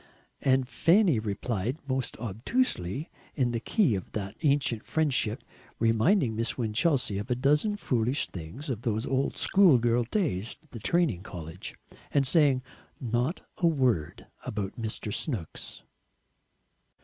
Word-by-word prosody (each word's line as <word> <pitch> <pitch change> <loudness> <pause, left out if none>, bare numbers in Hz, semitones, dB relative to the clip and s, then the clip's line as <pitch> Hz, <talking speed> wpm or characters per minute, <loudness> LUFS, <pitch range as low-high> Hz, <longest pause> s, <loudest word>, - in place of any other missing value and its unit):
And 130 -1 +3
Fanny 170 - +4
replied 110 +3 -2
most 130 -2 -2
obtusely 120 - -1 0.2
in 125 -4 +1
the 115 - -1
key 170 - +2
of 95 -3 -4
that 100 -1 -4
"ancient 140 -7 +1
friendship," 135 -8 0 0.3
reminding 115 - +3
Miss 115 0 -1
Winchelsea 120 - +1
of 105 - -6
a 125 - +2
dozen 150 - +2
foolish 125 - 0
things 90 - -8
of 120 -6 -3
those 110 0 -1
old 135 +1 0
schoolgirl 120 -11 +4
days 120 - -1
at 155 - -28
the 115 - -7
training 145 - +1
college, 85 -1 -7 0.4
and 140 -1 +3
saying 135 -3 +4 0.4
not 120 +6 -1 0.2
a 170 - +4
word 125 - +1 0.2
about 100 -2 -4
Mr. 110 -1 -3
Snooks! 110 - -4
125 Hz, 130 wpm, -28 LUFS, 110-145 Hz, 0.4 s, Fanny